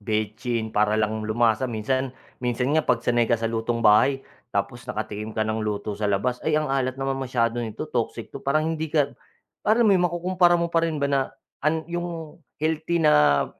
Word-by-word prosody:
betsin 110 +2 -2
para 105 0 +2
lang 110 0 0
lumasa. 110 +3 +1
Minsan 130 +4 -2 0.2
minsan 125 +2 0
nga, 160 - +4
'pag 120 -5 0
sanay 120 -1 +2
ka 120 - +3
sa 115 - -5
lutong 115 +1 -1
bahay, 130 +6 +5 0.2
tapos 100 +3 -3
nakatikim 105 0 -5
ka 110 - +1
ng 110 0 -1
luto 105 0 -2
sa 105 0 -2
labas, 120 +6 0
"Ay, 155 -1 +1
ang 155 - +1
alat 130 -1 0
naman 135 0 -2
masyado 120 -2 0
nito, 110 -3 -4
toxic - - -3
'to", - - -7
parang 155 +3 +1
hindi 160 0 -3
ka, 145 -2 +1 0.6
alam 230 +2 +5
mo 210 - +5
'yon, 180 -2 +3
makukumpara 175 0 +3
mo 170 0 -2
pa 165 - +4
rin 165 -1 -1
ba 145 - -1
na 140 -1 +2 0.4
an 160 +1 0
'yung, 170 -2 -5 0.2
healthy 160 +2 -1
na, 75 - +5
125 Hz, 195 wpm, -24 LUFS, 110-155 Hz, 0.6 s, bahay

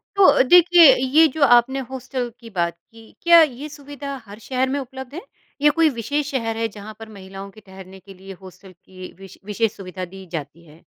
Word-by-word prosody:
तो 395 - +3
अ, 285 - +5
देखिए, 345 0 +7
ये 275 +6 +3
जो 315 - 0
आपने 245 +1 +4
हॉस्टल 255 -1 -5
की 230 -2 -13
बात 170 -4 -3
की, 225 -1 -17
क्या 340 -1 +7
ये 295 -1 -2
सुविधा 285 -1 -9
हर 205 +1 -13
शहर 260 0 -1
में 280 +2 -2
उपलब्ध 265 0 -9
है? 345 - -6 0.4
या 295 - +5
कोई 325 0 +2
विशेष 285 +5 -3
शहर 225 -4 -3
है 225 0 -1
जहाँ 210 0 -11
पर 225 0 -11
महिलाओं 195 -1 -11
के 215 +2 -17
ठहरने 190 0 -13
के 195 +1 -15
लिए 195 +1 -12
हॉस्टल 190 0 -14
की 185 +1 -13
विश 195 -1 -13
विशेष 210 +1 -2
सुविधा 185 -1 -7
दी 190 0 -11
जाती 155 0 -7
है? 155 +1 -19
230 Hz, 210 wpm, -21 LUFS, 195-280 Hz, 0.4 s, देखिए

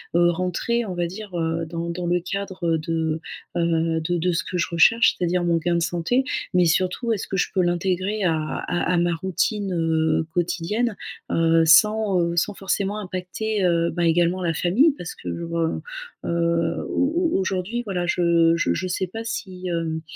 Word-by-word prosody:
heu, 175 0 +5
rentrer 185 +7 -1
on 185 - -4
va 175 -1 -1
dire, 195 0 -8
heu, 165 0 -1
dans 170 +1 -4
dans 175 +1 -4
le 175 +1 +2
cadre 185 -3 -2
de, 160 0 -2 0.4
heu, 165 -1 +1
de 175 +2 -1
de 180 +2 +1
ce 165 - -1
que 180 - -3
je 175 - +1
recherche, 230 +8 +5
c'est-à-dire 175 0 0
mon 170 -1 +2
gain 170 +1 0
de 170 - +1
santé, 175 +11 0 0.3
mais 180 0 +4
surtout 185 +8 +1
est-ce 210 - -2
que 195 - -4
je - - +1
peux 185 - +2
l'intégrer 185 +4 0
à 165 -3 +2 0.3
à 180 +1 0
à - - +2
ma 175 0 +2
routine, 190 +3 -1
heu, 160 -1 +1
quotidienne, 190 +6 -1 0.4
heu, 165 0 +3
sans, 200 +3 +5
heu, 170 0 -1
sans 205 +5 +1
forcément 200 +1 -2
impacter, 190 +2 -3
heu, 170 -1 +2
bah 175 0 -1
également 175 +2 +2
la 170 -2 0
famille 225 - +3
parce 175 - -7
que - - -7
je 170 - -5
re 165 -1 -1 0.4
heu, 170 0 0
au 330 +5 +1
au - - +2
aujourd'hui 195 +5 -2
voilà 180 -4 -2
je 170 -1 +3
je 170 - +1
je 185 - -2
sais 185 +1 -2
pas 225 +5 -7
si, 190 -5 -5
hem, 165 -2 -2
175 Hz, 190 wpm, -23 LUFS, 170-195 Hz, 0.4 s, heu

